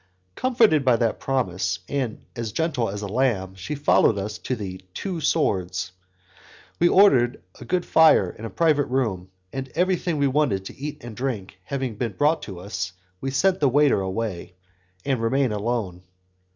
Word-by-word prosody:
Comforted 230 - +3
by 125 -3 +4
that 115 -1 0
promise, 95 -8 -1
and 130 -6 -3
as 115 -2 -4
gentle 140 -4 -1
as 105 +1 -5
a - - -3
lamb, 100 -4 0
she 95 +11 -5
follows 140 -6 +3
us 105 +2 -4
to 130 - -2
the 95 -4 -6
"Two 185 -5 -4
Swords." 95 - 0 0.9
We 175 - +5
ordered 125 - +4 0.2
a - - -9
good 180 -1 0
fire 160 - +5
in 110 - -13
a 115 - -4
private 150 -2 +2
room, 110 -9 -1 0.2
and, 135 0 -4
everything 180 -2 +1
we 140 - +2
wanted 130 -9 +1
to - - -8
eat 145 -1 -7
and 120 -2 -8
to 125 - -10
drink 100 -8 -4
having 130 -4 -3
been 115 -2 -2
brought 150 +3 +1
in, 90 0 -8 0.5
we 135 - -2
send 185 +8 +2
the 140 - +3
waiter 145 -5 +3
away, 95 -2 -4 0.5
and 135 -4 0
remain 130 +2 +1
alone. 105 -4 -2
125 Hz, 170 wpm, -24 LUFS, 100-145 Hz, 0.9 s, We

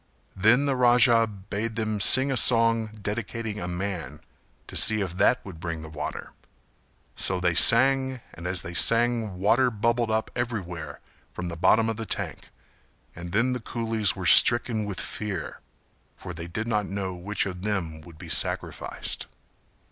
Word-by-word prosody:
Then 110 +8 +3
the 140 -2 0
Raja 120 -2 +4
bade 105 +2 -6
them 110 -2 -2
sing 130 +7 +5
a - - 0
song 115 -2 +5
dedicating 110 +1 -5
a 85 - -5
man, 90 -5 -5 0.5
to - - -10
see 110 0 +4
if 90 -3 -4
that 125 - +2
would 90 -5 -10
bring 80 -2 -5
the 80 - -9
water; 75 -1 -6 0.8
so 90 - -1
they 90 -1 +1
sang 130 +7 +4
and 85 +2 -8
as 90 0 -1
they 85 - -7
sang 115 0 +2
water 115 +7 +2
bubbled 115 +1 -1
up 110 0 -1
everywhere 105 -9 -5 0.3
from 90 0 -5
the 85 - -6
bottom 110 +7 +3
of 115 -1 -3
the 115 -1 -6
tank - - -5 0.7
and 85 +1 -8
then 115 +6 +1
the 125 - -3
coolies 115 -3 -1
were - - -6
stricken 120 -2 +5
with 100 -4 -5
fear 105 -5 -5 0.6
for 90 - -8
they 85 0 -7
did 110 +7 -5
not 105 -3 -1
know 95 -1 -4
which 95 +4 -3
of 90 -2 -6
them 90 -6 -3
would 80 0 -15
be 90 +1 -11
sacrificed. - - -3
105 Hz, 165 wpm, -25 LUFS, 90-115 Hz, 0.8 s, sing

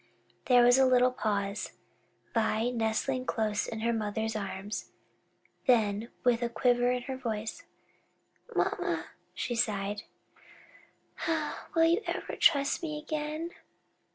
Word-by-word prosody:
'" - - -37
There 245 -2 +7
was 245 +2 +6
a 265 - +6
little 250 0 +5
pause, 205 -4 -2 0.6
Vi 225 +1 +1
nestling 245 +3 -1
close 215 -2 0
in 220 -1 -5
her 235 +1 +1
mother's 220 0 -2
arms; 200 0 -4 0.8
then 220 -2 +3
with 245 -1 +3
a 240 - 0
quiver 245 +1 +2
in 250 -1 -1
her 265 0 -4
voice, 225 -4 -4 0.9
"Mamma," - - 0 0.3
she 245 - -2
sighed, 205 -3 0 1.7
"will 325 - +5
you 335 +5 +4
ever 345 - -3
trust 280 -3 +3
me 305 -3 -3
again?" 305 +2 -3
235 Hz, 125 wpm, -30 LUFS, 215-260 Hz, 1.7 s, There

